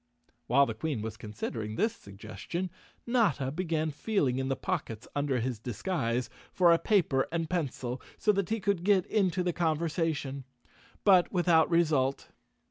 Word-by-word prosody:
Wliile 140 +4 +5
the 115 - -3
Queen 120 -1 -3
was 110 -1 -5
considering 110 0 -5
this 225 - +1
suggestion, 110 - -6 0.3
Notta 185 - +1
began 160 -1 -1
feeling 145 - 0
in 135 - -1
the 135 - 0
pockets 130 - -4
under 140 -3 0
his 120 -1 -2
disguise 120 - -2 0.2
for 175 -2 +5
a 165 - +3
paper 160 -11 +2
and 165 -1 -1
pencil, 135 -7 -3 0.2
so 210 - +3
that 200 -3 -1
he 225 +1 0
could 200 -4 0
get 195 -2 +3
into 185 -4 +1
the 175 -1 0
conversation, 160 -4 -1 0.6
but 185 -4 +5
without 175 -3 +3
result. 150 -6 +1
160 Hz, 150 wpm, -30 LUFS, 130-180 Hz, 0.6 s, Wliile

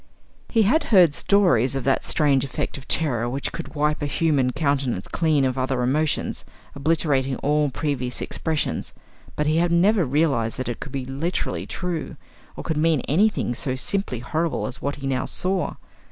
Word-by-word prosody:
He 225 -2 +3
had 270 +11 +2
heard 180 -8 +5
stories 145 - +3
of 135 - -2
that 135 +1 +1
strange 140 -5 +2
effect 135 -2 -4
of 135 - -10
terror 120 -7 0
which 135 +3 -3
could 140 +4 -7
wipe 150 +1 0
a 145 - -1
human 145 -4 +1
countenance 135 - -1
clean 155 -5 +1
of 130 0 -1
other 130 -1 0
emotions, 150 +5 0 0.3
obliterating 140 -3 +1
all 150 +2 +1
previous 130 -3 -2
expressions; 160 -2 -2 0.4
but 150 - -1
he 155 +1 +2
had 170 +1 +2
never 190 +4 +4
realised 135 -5 +1
that 130 - -3
it 120 - -4
could 140 - -7
be 135 -2 -4
literally 140 +7 -3
true, 175 -5 -4 0.4
or - - -7
could 160 - -2
mean 155 -3 +2
anything 190 - +1
so 130 +2 -2
simply 190 0 -1
horrible 155 +8 -2
as 125 - -6
what 140 +1 -2
he 140 - -8
now 130 -1 -1
saw. 185 0 0
145 Hz, 175 wpm, -23 LUFS, 130-165 Hz, 0.4 s, heard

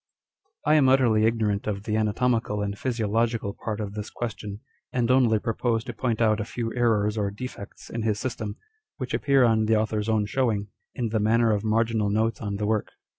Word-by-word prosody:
I 150 - +4
am 145 -4 +5
utterly 120 -5 +4
ignorant 110 -3 0
of 100 -2 -2
the 105 0 -1
anatomical 110 -1 +1
and 100 0 -3
physio 115 0 -2
logical 115 -1 0
part 110 -1 -3
of 100 -2 -4
this 105 0 -5
question, 105 -3 -6 0.3
and 125 -1 +1
only 125 -4 +4
propose 115 +1 -1
to 120 - -6
point 115 -1 -1
out 110 -2 +3
a - - -1
few 115 +1 -4
errors 110 -3 +1
or 100 -1 0
defects 100 -1 -8
in 115 - -4
his 110 -2 0
system, 110 -5 -4 0.4
which 130 -2 -5
appear 135 +3 +3
on 110 -2 +3
the 110 +1 +3
author's 110 0 0
own 110 -2 +2
showing, 105 -3 0 0.3
in 120 -2 -1
the 110 0 0
manner 115 +2 +3
of 105 -1 0
marginal 110 -1 +1
notes 110 +2 0
on 100 -2 -3
the 105 +1 -2
work. 110 0 0
110 Hz, 200 wpm, -26 LUFS, 105-120 Hz, 0.4 s, am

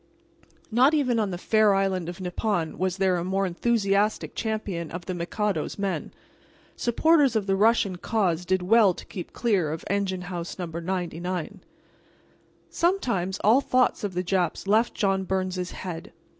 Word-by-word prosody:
Not 260 +7 +5
even 250 -6 +1
on 210 -2 0
the 180 - -4
fair 215 +2 +3
island 190 -3 0
of 175 +2 -8
Nippon 180 -2 -2
was 185 0 0
there 190 -2 +2
a 170 - -2
more 190 +2 0
enthusiastic 205 +2 0
champion 205 -7 -3
of 175 +1 -7
the 185 - -3
Mikado's 175 0 -2
men. 200 -1 -2 0.6
Supporters 280 +1 +3
of 215 -3 +1
the 195 -1 +1
Russian 205 -2 +3
cause 180 -4 0
did 185 0 0
well 205 -1 +5
to - - -10
keep 180 - -7
clear 195 -10 0
of 160 - -6
Engine 195 -2 -1
House 175 -1 -6
No. 180 - -3
99. 175 0 -4 1.1
Sometimes 235 - 0
all 230 +7 +5
thoughts 255 -3 +1
of 195 -3 -3
the 180 - 0
Japs 180 -2 -1
left 220 +4 +2
John 195 -3 +1
Byrnes's 185 -1 -2
head. 180 +1 -7
190 Hz, 155 wpm, -26 LUFS, 180-215 Hz, 1.1 s, Not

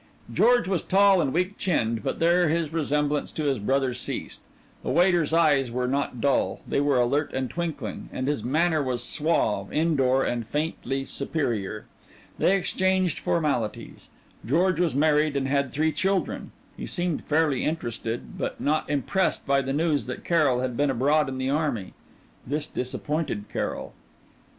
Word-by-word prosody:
George 240 -3 +4
was 185 -4 0
tall 195 -1 +4
and 135 - 0
weak 180 +5 -1
chinned, 115 - 0
but - - -2
there 170 0 +3
his 160 -1 -1
resemblance 150 -2 0
to 155 - -3
his 140 -5 +1
brother 130 +4 +1
ceased. - - -5 0.4
The - - -4
waiter's 175 -4 +3
eyes 150 -6 +3
were 125 +1 -1
not 135 -1 -1
dull, 140 +2 +1
they - - +1
were 145 -2 +2
alert 140 +5 +1
and 130 -1 -2
twinkling, 170 -3 -4
and 130 - -3
his 145 -6 -1
manner 155 +5 +2
was 125 -3 -2
suave, 110 -11 0
in 160 +1 +1
door, 135 -1 +3
and 120 -1 -1
faintly 135 +1 -3
superior. 120 - -2 0.5
They 195 - +4
exchanged 185 -2 +1
formalities. 140 -10 -2 0.3
George 170 - +2
was 170 -6 +1
married 150 0 +3
and 135 -1 -1
had 140 -1 0
three 155 +4 +1
children. 190 +6 -1 0.2
He - - -6
seemed 175 -3 -1
fairly 150 -4 +1
interested, 120 -7 -4
but - - -3
not 150 +1 0
impressed 150 +7 0
by 140 -1 +3
the 135 0 -3
news 150 -1 0
that 125 - -6
Carrol 145 -8 +2
had 130 -2 -2
been 145 +3 +1
abroad 140 +3 +2
in 130 - -5
the 130 +1 -1
army. 145 -10 -1 0.5
This 145 +3 -1
disappointed 130 -3 -3
Carrol. - - -3
145 Hz, 160 wpm, -26 LUFS, 130-165 Hz, 0.5 s, George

